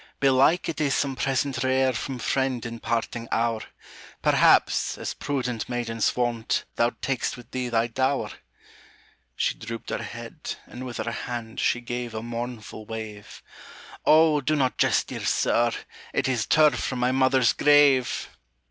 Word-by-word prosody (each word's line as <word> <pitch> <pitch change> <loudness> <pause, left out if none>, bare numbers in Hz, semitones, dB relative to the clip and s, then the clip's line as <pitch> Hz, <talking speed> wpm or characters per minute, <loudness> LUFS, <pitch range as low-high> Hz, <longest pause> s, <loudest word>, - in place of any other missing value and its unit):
"Belike 135 +5 +4
it 165 - -3
is 140 -3 +2
some 140 -2 0
present 135 -1 -1
rare 130 0 +2
From 130 +3 -4
friend 130 0 -1
in 115 0 -6
parting 115 0 -2
hour; 115 -1 +1 0.6
Perhaps, - - +4
as - - -4
prudent 125 -5 -3
maidens 115 -3 -1
wont, 120 -2 -1
Thou 120 - +3
tak'st 130 -2 -1
with 120 - -14
thee 130 -1 -2
thy 115 -1 +2
dower" 130 +4 -1 1.0
She - - +1
drooped 115 +1 -7
her - - -2
head, - - -7
and 130 +1 -8
with 120 - -6
her 115 +1 -2
hand 115 -1 -5
She 120 - +1
gave 120 -1 -5
a 110 - -4
mournful 115 -2 -6
wave: 110 -2 -8 0.6
"Oh, 155 -1 +5
do 155 +3 +1
not 130 -3 0
jest, - - +3
dear - - -5
sir! 120 0 +2 0.4
it - - +1
is 125 -5 0
Turf 155 -1 +4
from 130 - -2
my 125 +1 +1
mother's 130 -2 +3
grave!" 145 -4 +4
125 Hz, 155 wpm, -25 LUFS, 115-135 Hz, 1.0 s, Oh